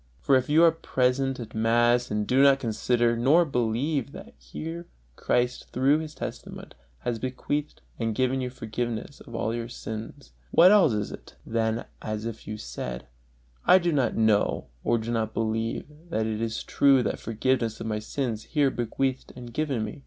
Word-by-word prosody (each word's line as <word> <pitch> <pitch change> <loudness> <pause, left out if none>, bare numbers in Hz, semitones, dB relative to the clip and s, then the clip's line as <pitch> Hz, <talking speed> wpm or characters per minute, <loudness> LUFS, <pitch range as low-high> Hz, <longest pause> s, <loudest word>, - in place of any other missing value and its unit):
For 135 - +3
if 130 +1 +1
you 160 +3 +5
are 165 - +7
present 135 -4 0
at 115 -2 -8
mass 120 +2 +3
and 105 0 -1
do 130 +4 +3
not 140 -1 +6
consider 120 0 +1
nor 140 +9 +4
believe 135 +2 -1
that - - -10
here 165 +2 -7 0.3
Christ 125 0 0
through 135 +4 +3
His 155 -1 -7
testament - - -7 0.3
has 120 -2 -2
bequeathed 145 +4 -3 0.2
and 115 -2 -1
given 130 +2 +1
you 125 - -2
forgiveness 120 +2 -4
of 115 - -10
all 110 0 -1
your 115 0 -4
sins, 110 - -8 0.2
what 180 +3 +7
else 190 - +5
is 105 -1 -2
it, - - -11
than 115 0 -1 0.2
as 110 0 -4
if 115 -1 -6
you 105 +1 -4
said: - - -6 0.6
"I - - +8
do 175 -2 +1
not 140 -5 +1
know 110 -2 +2
or 120 - +2
do 115 +1 -4
not 110 -2 -1
believe 115 0 -1 0.2
that 110 -9 0
it 110 0 -2
is 115 0 -2
true 135 -3 +4
that - - -2
forgiveness 115 0 -1
of - - -5
my 110 -1 -1
sins 115 0 -3
is - - -17
here 145 -4 +3
bequeathed 130 +3 -2
and 120 -1 -9
given 140 -6 -1
me"? 105 +6 -8
120 Hz, 180 wpm, -26 LUFS, 110-135 Hz, 0.6 s, I